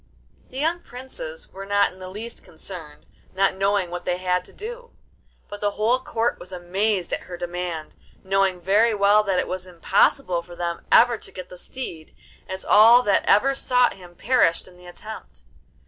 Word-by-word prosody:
The 260 - -9
young 325 +5 0
Princes 485 - -10
were 195 - -7
not 200 0 +2
in 185 - -17
the 185 0 -8
least 220 +5 -8
concerned, 160 -2 -11 0.3
not 195 +1 +3
knowing 195 -2 0
what 175 0 -5
they 180 - -1
had 180 0 0
to - - -14
do; 475 +3 -8 0.6
but 205 - -9
the 205 - +2
whole 230 +4 +2
Court 235 -2 -1
was 180 - -11
amazed 185 +1 -1
at - - 0
her 175 - -6
demand, 175 -2 -5 0.3
knowing 190 -1 +1
very 210 +6 +3
well 205 +1 +5
that 195 -3 0
it - - 0
was 185 0 -5
impossible 175 +2 +1
for 175 0 -13
them 170 -1 -4
ever 240 -1 +6
to - - -10
get 185 -1 -9
the 180 - -11
steed, 170 -12 -8 0.3
as 190 0 -5
all 230 +4 +7
that 200 -3 +2
ever 270 +6 +4
sought 250 -2 +2
him 175 -2 -15
perished 200 -6 +2
in 180 - -17
the 180 0 -15
attempt. 175 - -11
195 Hz, 185 wpm, -23 LUFS, 180-230 Hz, 0.6 s, all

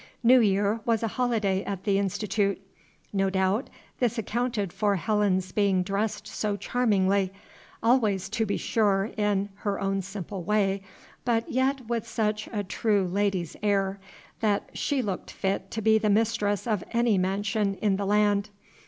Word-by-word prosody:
New 250 +2 +7
Year 205 0 +2
was 230 0 +1
a - - +2
holiday 215 -6 0
at 195 -2 -5
the 200 -1 +2
Institute. 200 0 0 0.5
No 195 -1 +2
doubt 190 +5 0 0.3
this 245 -1 +1
accounted 225 -3 -1
for 205 -2 +1
Helen's 190 -2 +1
being 195 -3 +2
dressed 205 +2 -2
so 210 -1 -2
charmingly, 200 -3 +1 0.5
always, 215 -6 +2
to 225 +2 0
be 200 - 0
sure 205 -2 +1
in, 205 -1 0
her 205 -1 -2
own 195 0 0
simple 195 0 -6
way, 200 0 +1 0.4
but 230 -2 +1
yet 260 0 +1
with 235 -2 -2
such 215 -1 -1
a 210 -2 -2
true 200 0 +1
lady's 185 -2 -1
air, 195 -1 +1 0.4
that 210 -2 0
she 275 -3 0
looked 195 -4 -4
fit 195 0 -2
to 220 - -4
be 220 0 +5
the 215 -1 +1
mistress 205 -1 +1
of 215 -6 0
any 235 -4 +3
mansion 200 +2 0
in 195 -1 +1
the 200 - -2
land. 205 0 +2
205 Hz, 155 wpm, -27 LUFS, 195-220 Hz, 0.5 s, New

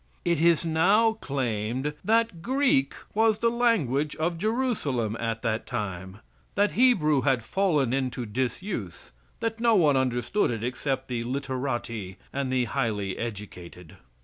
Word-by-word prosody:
It 170 -3 +1
is 170 0 +4
now 195 +8 +4
claimed 130 +1 -2
that 225 -5 +1
Greek 250 - +2 0.2
was 220 0 +3
the 230 +1 +2
language 160 - +1
of 165 +1 -1
Jerusalem 190 - 0
at 115 -1 -3
that 115 0 -1
time; 95 -3 -5 0.3
that 205 +1 +3
Hebrew 175 - +4
had 130 -3 +1
fallen 150 - +1
into 130 -2 -1
disuse; 120 - -4 0.3
that 225 0 -2
no 230 -1 +4
one 155 -7 +4
understood 130 - +1
it 115 -2 -3
except 130 +2 -2
the 120 -2 -2
literati 125 -6 -3 0.2
and 140 -1 -2
the 130 -1 +2
highly 110 -7 -1
educated. 95 -6 -8
135 Hz, 135 wpm, -27 LUFS, 115-190 Hz, 0.3 s, is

